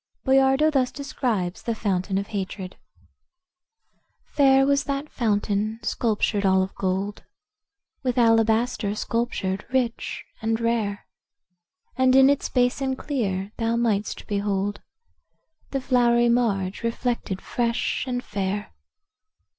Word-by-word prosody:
Boiardo 270 +3 +4
thus 260 -4 +1
describes 230 -10 -2
the 230 - -2
fountain 190 -2 -1
of 200 +1 -3
hatred: 190 -2 -5 1.5
"Fair 270 -1 +4
was 280 0 +2
that 280 +1 -3
fountain, 215 -1 0
sculptured 215 -2 0
all 190 -1 +4
of 190 - -6
gold, 195 +2 -2 0.8
With 250 -2 -1
alabaster 225 -2 +2
sculptured, 210 -4 -2
rich 250 -3 -1 0.2
and 225 0 0
rare; 225 -3 -1 0.9
And 260 0 +4
in 270 +1 +7
its 285 - -1
basin 260 +1 +1
clear 205 -9 -2
thou 230 0 0
might'st 220 -3 -1
behold 205 0 -1 0.9
The 275 - -1
flowery 240 -2 +3
marge 205 -6 0
reflected 230 -4 -2
fresh 235 +2 -1
and 250 -1 -2
fair. 200 0 -3
230 Hz, 110 wpm, -24 LUFS, 200-255 Hz, 1.5 s, in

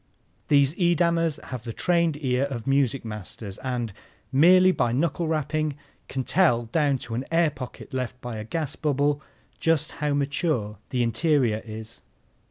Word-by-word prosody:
These 140 -1 +4
Edamers 170 -2 +2
have 125 -3 -5
the 115 - -5
trained 170 -1 +2
ear 130 +1 +2
of 125 -5 -5
music 135 -2 +1
masters 105 -1 -6
and, 120 -5 -3 0.4
merely 185 +7 +6
by 120 -9 +1
knuckle 160 +5 0
rapping, 155 -1 -1 0.3
can 130 -1 -3
tell 140 -8 +3
down 140 +3 +1
to 115 - -7
an 120 +3 -2
air 165 -2 +3
pocket 130 -2 -9
left 125 -1 -3
by 120 -3 -6
a 110 - -4
gas 150 +6 -3
bubble 145 0 +1 0.4
just 165 -3 +1
how 150 -1 +1
mature 140 - 0
the 125 -2 0
interior 120 -2 +2
is. 110 0 -8
140 Hz, 155 wpm, -25 LUFS, 120-155 Hz, 0.4 s, merely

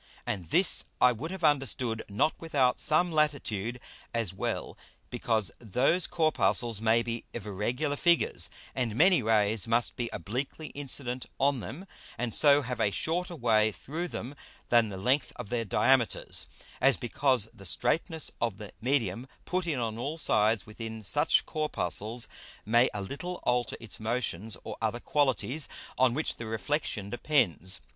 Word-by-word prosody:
And 90 -5 -3
this 180 - +3
I 125 - +6
would 130 +8 -5
have 190 -1 -7
understood 130 -6 +1
not 105 +10 +1
without 140 -6 +1
some 170 +3 +4
Latitude, 125 -7 0 0.4
as 115 -6 -1
well 95 - -3 0.4
because 110 -6 0
those 125 - +1
Corpuscles 120 - +2
may 115 +1 +3
be 115 0 -4
of 115 -4 -5
irregular 120 +9 -2
Figures, 170 +3 +3 0.2
and 120 -5 -2
many 175 +3 +5
Rays 110 -1 +2
must 115 +1 +1
be 120 -2 -3
obliquely 130 - -4
incident 130 -3 -4
on 140 -1 +2
them, 160 - -7 0.3
and 115 -1 -2
so 145 -1 +5
have 125 0 -4
a - - +3
shorter 175 - -2
way 110 -5 +3
through 160 - -5
them 130 -4 -6 0.4
than 115 -2 +4
the 95 - -6
length 130 +7 0
of 120 -5 -8
their 120 -1 -1
Diameters, 120 +4 +2 0.3
as 135 0 +5
because 125 -2 +1
the 95 - -14
straitness 155 - 0
of 115 -5 -1
the 105 -1 -9
Medium 120 -2 0 0.2
put 180 -1 -1
in 155 -5 0
on 115 -2 -3
all 145 +6 -3
sides 110 -7 +2
within 110 0 -8
such 145 +10 +3
Corpuscles 115 - +1 0.4
may 120 +4 +4
a 105 - -4
little 175 - -5
alter 125 0 0
its 115 -4 -5
Motions 110 -3 -2
or - - -7
other 115 +1 -1
qualities 140 +1 0 0.3
on 125 -2 +4
which 155 - -2
the 115 - -6
Reflexion 110 -3 -2
depends. 95 - 0
120 Hz, 155 wpm, -29 LUFS, 110-145 Hz, 0.4 s, I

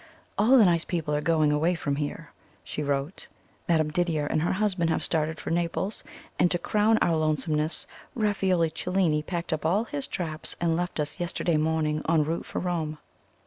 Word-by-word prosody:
"All 230 +7 +5
the 225 - +7
nice 170 -2 +3
people 160 -4 -2
are 150 - +1
going 155 -1 +2
away 160 +4 +2
from 140 -4 -2
here," 145 -1 -4 0.3
she - - -5
wrote. 140 +4 -2 0.4
"Madame 155 -2 +2
Didier 160 -2 0
and 150 - 0
her 170 - +1
husband 190 -4 0
have 160 - 0
started 160 -1 -1
for - - -5
Naples; 175 +4 -1 0.4
and, 175 - +4
to 175 - +1
crown 215 +4 +2
our 170 - +2
lonesomeness, 155 0 0 0.3
Raffaello 195 -7 +1
Cellini 165 -1 0
packed 170 +1 -3
up 155 - -3
all 185 +7 +2
his 145 - -4
traps, 155 -3 -1
and 170 -1 +1
left 175 -1 -3
us 150 +4 -2
yesterday 175 -2 0
morning 155 -1 0
en 160 -2 +4
route 165 +3 -3
for - - -6
Rome. 165 -4 -2
165 Hz, 185 wpm, -27 LUFS, 155-180 Hz, 0.4 s, the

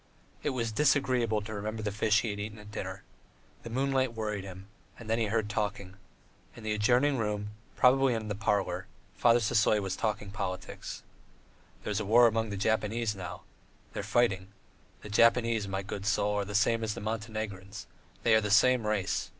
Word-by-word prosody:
It - - 0
was 120 -4 -2
disagreeable 125 -4 +2
to 110 +1 -7
remember 110 +1 -4
the 105 - -1
fish 105 +1 +2
he 115 - -2
had 100 - -6
eaten 105 +1 -5
at 105 0 -12
dinner. - - -6 0.6
The 115 - -8
moonlight 130 0 0
worried 105 -3 -3
him, 95 0 -9 0.3
and 115 - -11
then 115 +1 +1
he 115 - +2
heard 110 0 0
talking. 105 -2 -3 0.6
In 115 - -11
an 110 - -1
adjoining 125 +6 +3
room, 105 -1 -2 0.2
probably 130 -1 +4
in 110 -1 -4
the 105 - -2
parlour, 100 -3 -1 0.3
Father 120 0 +4
Sisoy 110 -1 +3
was 95 -2 -3
talking 105 -2 -2
politics: 95 -2 -5 0.8
"There's 105 0 -1
war 115 +4 +6
among 115 -1 +2
the 100 - -4
Japanese 110 +1 0
now. 90 -2 -7 0.5
They - - -4
are - - -3
fighting. 100 -6 +1 0.6
The 105 - -8
Japanese, 115 0 +3
my 95 0 -3
good 100 0 -5
soul, 100 +1 +2
are 100 -1 0
the 105 +1 -6
same 115 +3 +2
as 110 -1 -2
the - - -5
Montenegrins; 110 -3 -5 0.4
they 115 - +4
are 110 - +5
the 105 - -2
same 115 +2 +4
race. 105 -3 -1
110 Hz, 185 wpm, -30 LUFS, 105-115 Hz, 0.8 s, war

